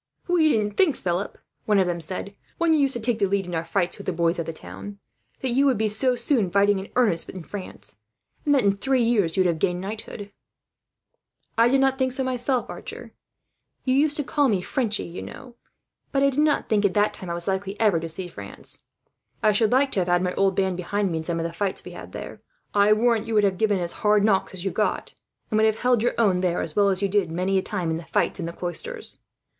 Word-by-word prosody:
"We 340 -3 +4
didn't 210 -2 -1
think, 330 -8 +4
Philip," 180 +2 -3 0.3
one 210 -1 +3
of 190 - +4
them 175 -1 -2
said, 185 +4 0 0.2
"when 335 -1 +3
you 310 - +3
used 275 -2 +2
to - - -2
take 230 0 -1
the 200 - +3
lead 195 0 0
in 175 - -7
our 165 0 -1
fights 175 +2 -1
with 200 - -9
the - - +1
boys 170 0 0
of 165 - -3
the - - -2
town, 200 +5 -9 0.4
that 260 - -1
you 275 +3 +3
would 260 -4 +2
be 215 0 +1
so 250 +5 +1
soon 235 -5 +1
fighting 200 +1 +3
in 190 - -8
earnest, 210 -10 +2
in 185 -3 -7
France; 185 - -8 0.5
and 290 -1 +3
that 265 - +3
in 200 - +4
three 255 +5 +1
years 205 -8 +1
you - - +5
would - - +2
have 165 -2 0
gained 180 +1 0
knighthood." 205 +1 -7 1.2
"I 230 +1 +5
did 270 +1 +3
not 270 0 +2
think 260 -1 +1
so 265 - -1
myself, 255 0 -1
Archer. - - -8 0.7
You 255 - +2
used 290 +2 +3
to 295 - 0
call 285 -1 +1
me 200 -4 +2
Frenchie, 215 +2 -1
you 170 - -7
know; 255 -3 -10 0.6
but 275 0 +2
I 275 - +4
did 270 - -2
not 300 -1 +2
think, 215 -2 +2
at 200 -2 +1
the 205 - +4
time, 205 -3 -2
that - - -6
I 170 - -2
was 170 0 -2
likely 195 +1 -2
ever 210 -7 +3
to 165 0 -5
see 180 +3 -2
France. 175 - -8 0.6
I 215 - +5
should 210 +1 +2
like 265 +2 +3
to - - +1
have 180 - 0
had 175 0 +2
my 180 0 -1
old 195 -1 +2
band 190 -2 0
behind 195 +2 -1
me, 165 - -1
in - - -5
some 170 0 -2
of 165 - -2
the 170 - -4
fights 195 +2 -3
we - - -8
had - - -10
there. - - -8 0.3
I 205 +1 +4
warrant 225 0 +2
you 225 - -2
would 210 - +4
have 195 -2 +1
given 210 -3 +2
as 170 -1 0
hard 210 -1 +4
knocks 195 -2 +1
as 180 +1 -6
you 195 - 0
got, 210 - -1 0.4
and 215 - +2
would 220 - +4
have 220 0 -1
held 245 -2 +3
your 240 - +1
own 200 -6 +3
there, 180 -1 0
as 160 - -6
well 200 -1 +4
as 190 0 +1
you - - +3
did 195 -3 +1
many 185 +3 +1
a - - -1
time 180 -5 -2
in 160 - -1
the 170 - -7
fights - - 0
in 170 - -3
the - - -4
Cloisters. 435 - -4
205 Hz, 260 wpm, -24 LUFS, 180-245 Hz, 1.2 s, you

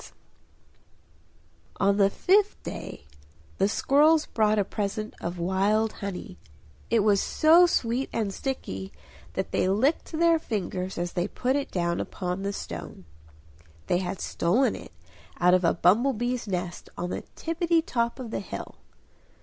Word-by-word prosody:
On 200 0 +3
the 200 -1 +5
fifth 400 - +2
day - - -7 0.5
the 195 - +4
squirrels 300 +7 +4
brought 215 -1 +1
a 205 - +3
present 210 +2 -3
of 175 +1 -4
wild 200 +5 +1
honey; 185 - -6 0.5
it 230 - +3
was 205 -1 +3
so 335 +3 +5
sweet 245 -3 0
and 210 -4 -1
sticky 95 - -4 0.4
that - - -3
they - - +1
licked 255 +11 +1
their 335 0 +4
fingers 190 - -3
as 175 0 -3
they 175 +1 0
put 255 +5 -1
it 285 -1 -1
down 170 -1 -1
upon 180 0 -3
the 200 0 -2
stone. 85 - -7 0.8
They 175 - +1
had 185 0 -4
stolen 225 +11 +1
it - - -10 0.5
out 180 0 +5
of 185 0 +4
a 170 - +3
bumble 225 +11 +4
bees' 240 0 -2
nest 180 -2 -4
on 180 +1 -3
the - - -3
tippitty 330 0 +1
top 235 -1 -1
of 240 -4 -6
the - - -2
hill. 195 - -7
205 Hz, 150 wpm, -27 LUFS, 180-260 Hz, 0.8 s, the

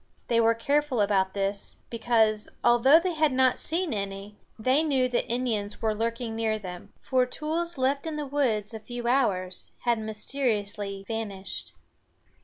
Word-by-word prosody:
They 230 -1 +4
were 230 0 +4
careful 280 +2 +1
about 195 -2 +2
this, 200 0 -2
because, 225 -2 +2
although 240 +6 +6
they 360 +1 -1
had 310 -2 +2
not 260 -1 +3
seen 335 -2 -1
any, 200 0 -4 0.2
they 255 +6 +3
knew 270 -5 +2
that 245 -1 -1
Indians 225 -4 -1
were 220 -1 +1
lurking 230 +1 -2
near 220 -1 0
them, 180 -4 -8
for 255 -1 +1
tools 320 +4 -2
left 275 +4 0
in 315 - -3
the 300 -1 -3
woods 240 -7 0
a 220 - -5
few 240 +2 -7
hours 190 -8 +1
had 235 -2 +1
mysteriously 210 -3 -2
vanished. 200 -4 -5
230 Hz, 155 wpm, -27 LUFS, 210-265 Hz, 0.2 s, although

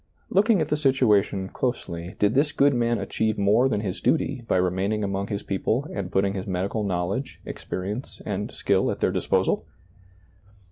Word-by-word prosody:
Looking 205 -1 +4
at 155 - -1
the 150 - +1
situation 110 -9 +2
closely, 90 -9 -3
did 105 +1 +2
this 145 +3 +2
good 140 0 +3
man 120 -1 +1
achieve 110 +2 -1
more 105 +6 +4
than 105 -4 0
his 100 -2 -4
duty 140 -5 +1
by - - +2
remaining 95 +4 0
among 100 0 -2
his 100 -1 -3
people 110 +8 -1
and 100 -2 -4
putting 95 0 +1
his 95 +1 -5
medical 95 +3 -1
knowledge, 95 +6 -2
ex - - -7
perience 105 +8 -4
and 105 +1 -3
skill 100 -1 +1
at - - -3
their - - +2
disposal - - 0
105 Hz, 175 wpm, -25 LUFS, 95-130 Hz, -, Looking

